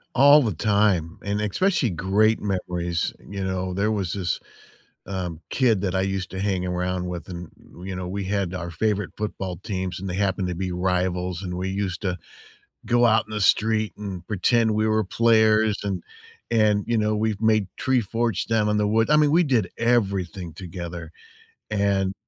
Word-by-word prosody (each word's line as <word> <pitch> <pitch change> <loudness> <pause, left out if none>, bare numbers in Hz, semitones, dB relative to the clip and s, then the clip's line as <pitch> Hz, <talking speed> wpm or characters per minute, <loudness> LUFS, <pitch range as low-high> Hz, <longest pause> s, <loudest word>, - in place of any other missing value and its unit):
All 145 +3 +8
the 110 -5 0
time, 100 -3 +1
and 100 +1 -1
especially 135 - +1
great 100 +5 +2
memories, 90 -4 -2
you 100 -1 -6
know? 95 -1 -2
There 100 +3 +1
was 95 -5 -1
this, 90 -4 -2 0.7
um, 90 -4 -4
kid 115 -7 +2
that 95 -2 -1
I 95 - +2
used 95 -1 -2
to 95 - -5
hang 95 -2 0
around 90 0 -2
with 90 -1 -6
and, 85 -2 -7 0.4
you 95 - -4
know, 90 -1 -4
we 100 +2 -3
had 95 -2 -1
our 85 -2 -4
favorite 100 +2 -1
football 95 -4 -4
teams 95 -2 -4
and 95 +1 -5
they 90 - -3
happened 95 -1 0
to 90 - -3
be 90 +1 -3
rivals, 90 0 -1
and 90 -1 -4
we 95 +1 -2
used 95 -2 -3
to 90 -2 -1 0.7
go 120 0 +3
out 110 -1 +4
in - - -12
the 105 - -2
street 110 +2 +2
and 95 -4 -6
pretend 110 +3 +2
we 110 +1 +1
were 110 0 +2
players 110 0 +3
and 95 -3 -3 0.5
and, 105 -3 +3
you 120 -1 0
know, 105 0 +1
we've 105 -1 -1
made 110 -3 +3
tree 130 -1 +2
forts 115 +1 -1
down 110 -2 +1
in 105 - +1
the 105 0 +2
wood 110 +3 +2
I 150 - +6
mean, 150 -1 +4
we 170 +3 +5
did 125 - +1
everything 95 -7 0
together, 85 -2 -7 0.6
and 100 -2 +1
100 Hz, 185 wpm, -24 LUFS, 90-110 Hz, 0.7 s, All